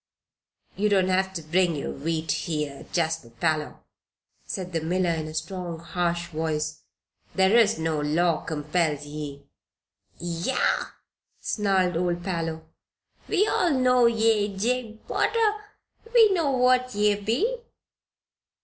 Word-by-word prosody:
"You 210 +2 +1
don't 190 -2 +3
have 190 +1 +1
to 165 - -4
bring 170 +2 +2
your 140 - -4
wheat 160 +1 -2
here, 150 -4 -3
Jasper 160 -6 -1
Parloe," 150 +6 -2 0.7
said 180 -1 -5
the 165 - 0
miller, 175 +2 +1
in 160 -2 -2
a 155 - -8
strong, 170 +1 -4
harsh 170 +1 -2
voice. 155 -1 -2 0.5
"There 190 +3 +4
is 225 -2 +5
no 160 -1 -1
law 160 +2 +1
compels 150 -1 -1
ye." 145 -1 -7 0.7
"Yah!" 175 +9 0 0.5
snarled 190 -5 +1
old 175 0 -1
Parloe. 165 -3 -3 0.6
"We 415 0 +3
all 345 -6 +2
know 250 -2 +4
ye, 220 -3 +2
Jabe 230 +1 -1
Potter. 430 -2 +1 0.5
We 440 -4 +7
know 330 -6 +1
what 255 -1 +2
ye 210 0 +3
be." 355 - 0
175 Hz, 125 wpm, -26 LUFS, 160-220 Hz, 0.7 s, We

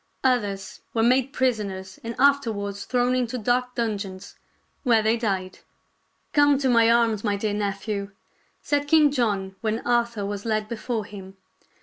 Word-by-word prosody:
Others 205 -7 -1
were 225 - +2
made 255 +3 +3
prisoners 205 -8 -2
and 230 0 -5
after 280 -3 +4
wards 200 -1 -5
thrown 250 0 +1
into 250 -1 -1
dark 250 +2 0
dungeons, 200 -5 -4 0.5
where 230 -5 +3
they 220 +1 +3
died. 195 -5 -2 0.4
" - - -45
Come 290 -1 +5
to 270 -1 0
my 230 -2 +5
arms, 230 -3 +3
my 205 -2 +1
dear 205 +1 -2
nephew," 200 0 -3 0.5
said 290 0 0
King 300 -1 +5
John 205 -8 -1
when 220 0 -2
Arthur 235 -3 +1
was 205 0 -4
led 215 -2 -1
before 225 -1 -3
him. 195 -2 -11
225 Hz, 155 wpm, -24 LUFS, 200-250 Hz, 0.5 s, Come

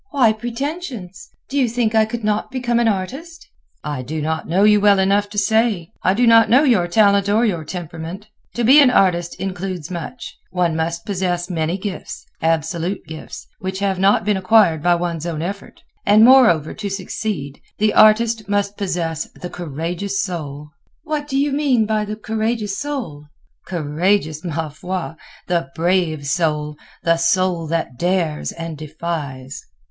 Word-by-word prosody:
"Why 255 -9 +3
pretensions? 240 - -6 0.2
Do 280 - -1
you 250 -3 +2
think 230 -1 0
I 220 -1 +4
could 230 +1 -5
not 210 0 0
become 245 -3 0
an 235 - +2
artist?" 265 - -4 0.4
"I 145 -3 -3
do 155 +5 -5
not 160 +1 -2
know 185 +5 +2
you 210 -1 +5
well 205 -1 +5
enough 200 +2 +2
to 205 - -9
say. 210 -4 +1
I 185 - +2
do 245 +3 +3
not 230 -1 +6
know 255 +6 +5
your 220 - +3
talent 200 +1 +3
or 220 +4 +3
your 175 -7 -1
temperament. 170 +3 -7 0.3
To 240 - -1
be 270 +6 +7
an 275 - +6
artist 175 -7 +2
includes 185 -3 -4
much; 180 +8 -7
one 175 -3 0
must 165 +1 -2
possess 180 -2 -2
many 165 +1 -1
gifts—absolute 170 -2 -3
gifts—which 185 +4 -8
have 195 -1 -1
not 195 -1 +3
been 210 -2 +2
acquired 185 -4 +4
by 175 +2 +3
one's 170 -1 -3
own 160 -2 -3
effort. 200 +3 -7 0.2
And, 215 +2 +6
moreover, 225 - +5
to 205 -1 -5
succeed, 185 -6 -4 0.2
the 215 0 +2
artist 220 0 +4
must 205 0 0
possess 170 -5 -2
the 180 - -8
courageous 175 +5 -4
soul." 150 -5 -5 0.3
"What 305 -2 -3
do 270 -2 -2
you 285 +1 +1
mean 270 -6 +2
by 215 0 0
the 210 +1 -5
courageous 220 -1 -2
soul?" 245 - -5 0.4
"Courageous, 160 0 0
ma 165 -2 -3
foi! 180 +5 -5 0.4
The 170 -5 0
brave 165 -3 0
soul. 150 -1 -1 0.3
The 165 0 +3
soul 170 0 +1
that 155 -6 -3
dares 175 -4 0
and 165 -1 -6
defies." 150 -4 -5
190 Hz, 160 wpm, -20 LUFS, 165-220 Hz, 0.4 s, be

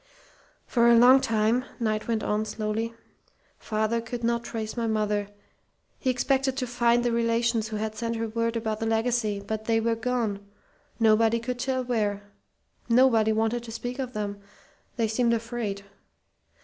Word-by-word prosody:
"For 235 -1 +3
a 235 - +7
long 255 +3 +7
time," 225 +2 +1 0.2
Knight 215 -2 -1
went 225 -2 -1
on, 210 +1 0
slowly, 215 +1 -3 0.6
"father 220 +1 -1
could 235 +1 -6
not 235 0 0
trace 220 -2 -5
my 235 -1 -1
mother. 210 -2 0 0.7
He 260 - -1
expected 265 +1 +1
to 255 - -1
find 240 0 +2
the 240 - +2
relations 230 -1 +1
who 220 - -5
had 215 0 -3
sent 230 +1 -2
her 225 0 -2
word 230 +1 -1
about 220 -2 -2
the 225 - -2
legacy, 225 -2 0
but 220 +1 -4
they 225 0 +2
were 230 +1 +1
gone 225 -4 -2 0.6
nobody 225 +1 +4
could 245 +1 -4
tell 260 0 -1
where. 210 -5 -1 0.7
Nobody 230 -3 +4
wanted 225 +2 0
to 230 -1 -9
speak 245 +3 -5
of 255 -2 -4
them. 205 -1 -4 0.6
They 230 -2 +1
seemed 235 +1 +2
afraid. 230 -4 -4
230 Hz, 160 wpm, -26 LUFS, 215-240 Hz, 0.7 s, a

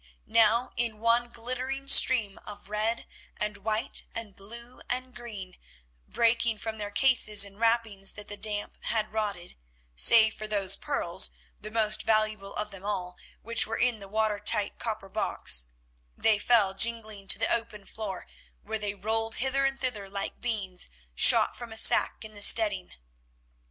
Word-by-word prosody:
Now 230 +2 +2
in 235 -2 -2
one 230 +2 0
glittering 255 +4 -6
stream 230 -7 +5
of 205 -1 -11
red 215 +2 -2 0.3
and 210 -1 -4
white 215 +2 -2
and 215 -4 -7
blue 235 +5 -9
and 255 +1 -4
green, 205 -7 -10 0.5
breaking 230 -1 0
from 220 0 -7
their 205 -1 -5
cases 215 -3 +4
and 200 +1 -13
wrappings 225 -4 0
that 205 -1 -9
the 205 - -3
damp 205 0 -2
had 215 -2 -2
rotted, 200 -5 -5 0.4
save 220 - +5
for 215 - -7
those 200 -3 +1
pearls, - - -1 0.3
the 210 - -8
most 215 -1 +1
valuable 215 -2 -1
of 210 0 -3
them 195 -1 -9
all, 185 -3 -4 0.3
which 230 0 0
were 225 - -4
in 245 -3 0
the 200 - -10
watertight 215 0 0
copper 215 -4 -5
box—they - - -1
fell 210 -4 +2
jingling 215 -2 -3
to - - +6
the 225 - +3
open 225 -3 -3
floor, 205 -4 -7 0.4
where 220 +1 -5
they 205 -1 -4
rolled 225 +2 -3
hither 270 +1 -1
and 270 0 -2
thither 215 -7 -5
like 200 0 -6
beans 200 -6 -2 0.2
shot - - +5
from 240 -2 -10
a 220 - -6
sack 220 - +6
in 215 - -10
the 205 - -11
steading. 205 -4 +5
215 Hz, 155 wpm, -27 LUFS, 200-230 Hz, 0.5 s, to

